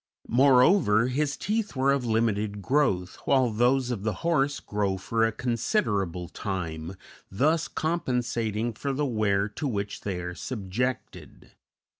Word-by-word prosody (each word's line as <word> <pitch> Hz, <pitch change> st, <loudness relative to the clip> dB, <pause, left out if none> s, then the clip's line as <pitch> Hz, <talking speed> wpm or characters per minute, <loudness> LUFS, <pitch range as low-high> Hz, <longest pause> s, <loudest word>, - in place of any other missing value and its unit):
Moreover, 125 Hz, -, +5 dB
his 140 Hz, +2 st, -1 dB
teeth 215 Hz, -4 st, -2 dB
were 135 Hz, +1 st, +3 dB
of 140 Hz, -2 st, +1 dB
limited 110 Hz, -2 st, 0 dB
growth, 100 Hz, -11 st, +1 dB
while 130 Hz, -4 st, +3 dB
those 125 Hz, +3 st, +2 dB
of 115 Hz, -5 st, -3 dB
the 110 Hz, +1 st, -1 dB
horse 145 Hz, -4 st, +2 dB
grow 100 Hz, -2 st, -1 dB
for 110 Hz, +4 st, 0 dB
a 115 Hz, -, +3 dB
considerable 105 Hz, -, -1 dB
time, 85 Hz, -3 st, -5 dB, 0.3 s
thus 155 Hz, -, +1 dB
compensating 120 Hz, -8 st, -1 dB
for 140 Hz, +5 st, -3 dB
the 145 Hz, +2 st, 0 dB
wear 105 Hz, -5 st, +1 dB
to 145 Hz, +7 st, -4 dB
which 100 Hz, -4 st, -3 dB
they 95 Hz, -3 st, -3 dB
are 90 Hz, 0 st, -5 dB
subjected. 115 Hz, +5 st, -4 dB
115 Hz, 135 wpm, -27 LUFS, 100-135 Hz, 0.3 s, Moreover